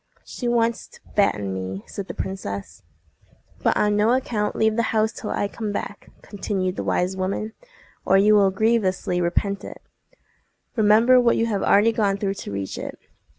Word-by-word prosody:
"She 245 - -5
wants 235 -1 +1
to - - -18 0.2
fatten 105 - +1
me," 95 +1 -5
said 200 -1 -7
the - - -7
princess. 100 - -5 0.8
"But - - +2
on 210 0 +2
no 215 +3 +3
account 225 -5 -1
leave 220 0 +2
the 235 - +2 0.2
house 220 0 +2
till - - -7
I 205 - -1
come 215 0 -5
back," 205 0 -6
continued 190 -2 -3
the - - -3
wise 180 +2 0
woman, 195 +4 -3 0.5
"or 190 - +4
you 210 +2 +5
will 200 -2 +5
grievously 190 -3 +1
repent 195 +3 -1
it. - - -9 1.0
Remember 225 +3 +5
what 235 -1 +3
you 230 - +2
have 205 -4 -1
already 210 +3 +4
gone 205 -3 +1
through 195 -1 -1
to 195 - -8
reach 100 -1 -4
it. - - -6
205 Hz, 175 wpm, -23 LUFS, 185-220 Hz, 1.0 s, you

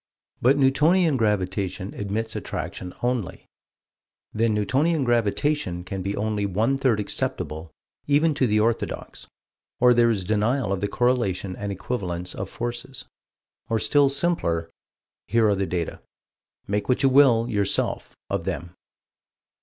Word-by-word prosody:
But 135 +4 +4
Newtonian 150 +4 +3
Gravitation 95 -4 -1
admits 110 +2 -3
attraction 90 - -5
only: 120 -6 -2 0.9
Then 115 +1 +1
Newtonian 140 +9 +1
Gravitation 120 - 0
can 95 +1 -5
be 100 +2 -2
only 105 0 -1
one 110 +8 +1
third 125 -6 +2
acceptable 80 -5 -3 0.4
even 150 +2 +3
to 130 -2 +1
the 105 0 +2
orthodox, 115 +2 -2 0.5
or 125 0 +6
there 120 0 +4
is 105 -5 0
denial 110 +3 0
of 95 - -2
the 100 - 0
correlation 110 -7 0
and 100 -1 -4
equivalence 90 -4 -4
of - - -5
forces. 120 +2 -5 0.6
Or 115 - +1
still 140 +5 +3
simpler: 110 - 0 0.6
Here 115 -1 +3
are 105 - +3
the 95 -1 -1
data. 85 -1 -3 0.6
Make 105 +3 -2
what 125 - +2
you 135 - +6
will, 130 -4 +5
yourself, 100 -4 -1
of - - -2
them. 85 +1 -4
110 Hz, 135 wpm, -24 LUFS, 100-130 Hz, 0.9 s, or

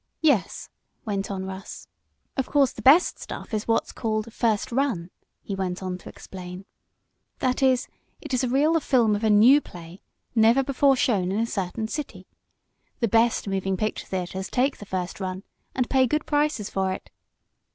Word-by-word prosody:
"Yes," 275 -11 +2 0.4
went 200 -2 -2
on 190 -1 -4
Russ. 190 0 -8 0.5
"Of 265 -2 -1
course 280 -2 +3
the - - -9
best 300 +7 +5
stuff - - -8
is 215 0 -2
what 225 - +3
is - - -12
called 215 0 -3
'first 220 -2 0
run,'" 235 -10 -1 0.3
he 200 - -5
went 190 -1 -3
on 185 -1 -4
to - - -11
explain. 185 0 -9 0.7
"That 255 +1 0
is, 260 -2 +3 0.3
it - - -7
is 255 - +1
a 250 - 0
reel 295 +6 +3
of 325 - +1
film 230 -6 +3
of 205 - -4
a 220 - +3
new 235 +8 +7
play, 175 -3 -12 0.3
never 230 +3 +4
before 275 +1 +3
shown 195 -8 +1
in 200 - -1
a 230 - +2
certain 210 +1 -3
city. 300 +5 -6 0.7
The 230 - +1
best 225 0 +2
moving 195 -1 -1
picture 215 +2 -3
theaters 190 0 -4
take 265 +2 +1
the 205 - -10
first 185 -1 -4
run, 185 0 -4 0.3
and 255 -2 +1
pay 260 -1 +3
good 300 +5 -1
prices 295 -8 0
for 190 -2 -1
it. - - -9
220 Hz, 185 wpm, -25 LUFS, 190-260 Hz, 0.7 s, new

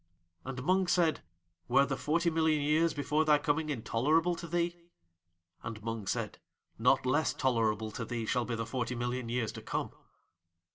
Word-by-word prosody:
And 130 -1 -5
Mung 185 +4 +2
said: 170 -2 +2 0.5
"Were 140 - +5
the 135 0 -2
forty 170 +5 +1
million 160 -2 +2
years 155 +3 +3
before 150 +2 0
thy 150 -1 +5
coming 150 +2 0
intolerable 150 +7 +1
to 170 - -7
thee?" 170 +1 0 0.9
And 110 -1 -7
Mung 115 -3 -4
said: - - -2 0.4
"Not - - +3
less 145 +5 +1
tolerable 110 -4 +1
to 115 - -5
thee 115 0 -3
shall 125 +2 0
be 120 - -2
the 115 0 -3
forty 125 0 -3
million 120 0 -3
years 120 -2 -1
to - - -9
come!" - - -3
140 Hz, 165 wpm, -31 LUFS, 115-160 Hz, 0.9 s, Were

